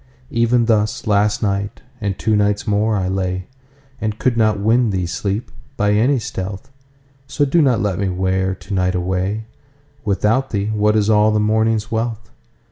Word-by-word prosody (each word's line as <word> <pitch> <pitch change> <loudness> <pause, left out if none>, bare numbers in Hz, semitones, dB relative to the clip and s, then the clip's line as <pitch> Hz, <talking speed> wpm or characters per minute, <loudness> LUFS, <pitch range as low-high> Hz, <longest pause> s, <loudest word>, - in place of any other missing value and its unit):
Even 115 0 +2
thus 110 -2 +1
last 105 +1 +2
night, 100 0 -2 0.2
and 100 -2 -2
two 110 -1 +1
nights 105 0 +1
more 105 +1 +1
I 95 -2 -1
lay, 95 -1 -2 0.6
And 110 -1 -2
could 125 +1 +1
not 110 -3 +2
win 115 +3 +3
thee, 95 -3 -1
Sleep! 100 +5 -3 0.3
by 105 0 +2
any 120 +7 +3
stealth:So 135 +8 -6
do 160 +5 +3
not 125 -8 +3
let 95 -4 -1
me 100 -1 0
wear 95 +1 0
to 100 +2 -9
night 90 -1 +1
away:Without 110 +6 -2
Thee 105 0 -1
what 105 0 +2
is 105 -1 +2
all 105 0 +4
the 110 0 +1
morning's 110 +1 +1
wealth? 115 0 -3
105 Hz, 160 wpm, -19 LUFS, 100-115 Hz, 0.6 s, all